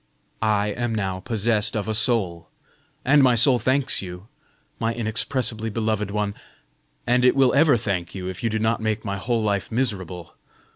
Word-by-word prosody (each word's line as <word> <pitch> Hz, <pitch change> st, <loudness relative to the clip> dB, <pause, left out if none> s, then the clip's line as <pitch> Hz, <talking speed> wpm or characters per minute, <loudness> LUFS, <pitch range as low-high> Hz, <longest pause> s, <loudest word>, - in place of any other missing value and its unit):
I 105 Hz, -1 st, +1 dB
am 115 Hz, +2 st, -2 dB
now 95 Hz, -3 st, -2 dB
possessed 110 Hz, 0 st, 0 dB
of 105 Hz, -1 st, -3 dB
a 110 Hz, -, -1 dB
soul, 105 Hz, -7 st, 0 dB, 0.6 s
and 145 Hz, +2 st, +5 dB
my 125 Hz, -2 st, +5 dB
soul 120 Hz, +2 st, +4 dB
thanks 135 Hz, +2 st, 0 dB
you, 90 Hz, 0 st, -8 dB, 0.5 s
my 115 Hz, 0 st, -1 dB
inexpressibly 115 Hz, 0 st, 0 dB
beloved 110 Hz, -2 st, -1 dB
one, 105 Hz, 0 st, -2 dB, 0.7 s
and 125 Hz, +1 st, +2 dB
it 125 Hz, -, +5 dB
will 135 Hz, -2 st, +4 dB
ever 145 Hz, -1 st, +5 dB
thank 95 Hz, -5 st, -3 dB
you, 90 Hz, -1 st, -5 dB
if 95 Hz, 0 st, -6 dB
you 115 Hz, -, 0 dB
do 110 Hz, -, -1 dB
not 110 Hz, +1 st, 0 dB
make 110 Hz, 0 st, -2 dB
my 100 Hz, -1 st, -2 dB
whole 115 Hz, +3 st, -1 dB
life 100 Hz, -1 st, -1 dB
miserable. 95 Hz, -8 st, -3 dB
110 Hz, 175 wpm, -23 LUFS, 100-120 Hz, 0.7 s, and